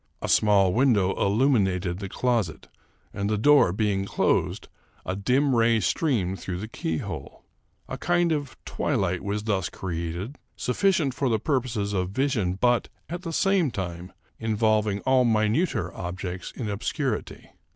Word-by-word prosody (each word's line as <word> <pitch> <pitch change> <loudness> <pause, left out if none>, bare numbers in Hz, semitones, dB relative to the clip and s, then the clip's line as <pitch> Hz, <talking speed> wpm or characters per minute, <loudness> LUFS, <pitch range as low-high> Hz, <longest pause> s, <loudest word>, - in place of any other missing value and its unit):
A - - -4
small 100 -3 +4
window 110 -7 +3
illuminated 100 -6 +1
the 100 -1 -5
closet, 110 -12 -1 0.5
and, 100 0 -2
the 105 - +1
door 145 -3 +5
being 100 0 0
closed, - - 0 0.4
a 95 - -2
dim 130 +7 +2
ray 115 -1 +4
streamed 95 - 0
through 90 -2 -4
the 105 +4 -5
keyhole. 80 -7 -5 0.4
A - - -6
kind 175 0 +2
of 145 -4 -2
twilight 95 -11 -1
was 100 +1 -2
thus 100 -4 -1
created, 85 - -5 0.2
sufficient 155 0 +1
for 135 0 0
the 110 - +2
purposes 115 -6 -1
of 90 -2 -1
vision, 110 -5 0
but, 120 +4 +2 0.2
at 175 +2 -4
the 170 -3 -5
same 190 -2 +2
time, 90 -4 -5 0.3
involving 110 -2 +1
all 130 -1 +3
minuter 110 - +1
objects 90 +1 -5
in 115 - -5
obscurity. 110 +4 -3
110 Hz, 140 wpm, -26 LUFS, 95-130 Hz, 0.5 s, door